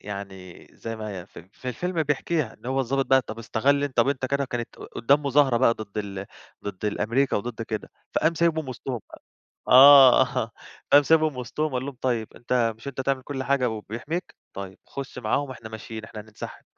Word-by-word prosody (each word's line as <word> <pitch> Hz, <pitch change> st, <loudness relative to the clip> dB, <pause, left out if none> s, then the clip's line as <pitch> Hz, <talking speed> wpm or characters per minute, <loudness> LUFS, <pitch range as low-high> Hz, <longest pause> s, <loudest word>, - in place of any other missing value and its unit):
يعني 95 Hz, -3 st, -8 dB
زي 115 Hz, 0 st, -6 dB
ما 110 Hz, -1 st, -6 dB
هي 95 Hz, -3 st, -7 dB
ف -, -, -14 dB
في 95 Hz, +9 st, -10 dB
الفيلم 170 Hz, +7 st, -1 dB
بيحكيها، 150 Hz, -2 st, -1 dB
إن -, -, -14 dB
هو 135 Hz, +1 st, 0 dB
الضابط 135 Hz, +2 st, 0 dB
بَقى، 130 Hz, -1 st, +4 dB
طَب 115 Hz, -, -8 dB
استغل 140 Hz, +5 st, +1 dB
أنت 140 Hz, -3 st, -5 dB
طَب 120 Hz, +3 st, +4 dB
أنت 135 Hz, -2 st, -1 dB
كده 140 Hz, +1 st, 0 dB
كانت 120 Hz, -2 st, -5 dB
قُدّام 140 Hz, +5 st, +1 dB
مظاهرة 135 Hz, -3 st, +4 dB
بَقى 115 Hz, -1 st, +4 dB
ضد 110 Hz, -1 st, -7 dB
ال 100 Hz, -1 st, -5 dB, 0.4 s
ضد 100 Hz, 0 st, -6 dB
ال 105 Hz, -, -1 dB
أمريكا 130 Hz, +6 st, +1 dB
وضد 115 Hz, +2 st, -4 dB
كده. 110 Hz, -1 st, -5 dB, 0.2 s
فقام 160 Hz, +2 st, +2 dB
سايبهم 160 Hz, -3 st, +1 dB
وسطهم 125 Hz, -1 st, -5 dB
بَقى -, -, -13 dB, 0.5 s
آه، 130 Hz, -3 st, +8 dB, 0.4 s
قام 145 Hz, +1 st, +9 dB
سايبهم 155 Hz, -1 st, +3 dB
وسطهم 140 Hz, +5 st, -3 dB
وقال 130 Hz, 0 st, -2 dB
لهم 140 Hz, -2 st, -6 dB
طيب 120 Hz, -4 st, -1 dB
أنت 120 Hz, -1 st, +1 dB
مش 115 Hz, +5 st, -9 dB
أنت 135 Hz, -, -5 dB
تعمل 130 Hz, 0 st, 0 dB
كل 135 Hz, 0 st, -4 dB
حاجة 130 Hz, -1 st, +1 dB
وبيحميك؟ 115 Hz, -, -5 dB, 0.2 s
طيّب 95 Hz, -1 st, -8 dB
خُش 135 Hz, -2 st, -7 dB
معاهم، 130 Hz, +4 st, -1 dB
إحنا 115 Hz, -3 st, -9 dB
ماشيين، 110 Hz, 0 st, -8 dB
إحنا 110 Hz, 0 st, -9 dB
هننسحب. 105 Hz, 0 st, -10 dB
125 Hz, 195 wpm, -25 LUFS, 110-140 Hz, 0.5 s, قام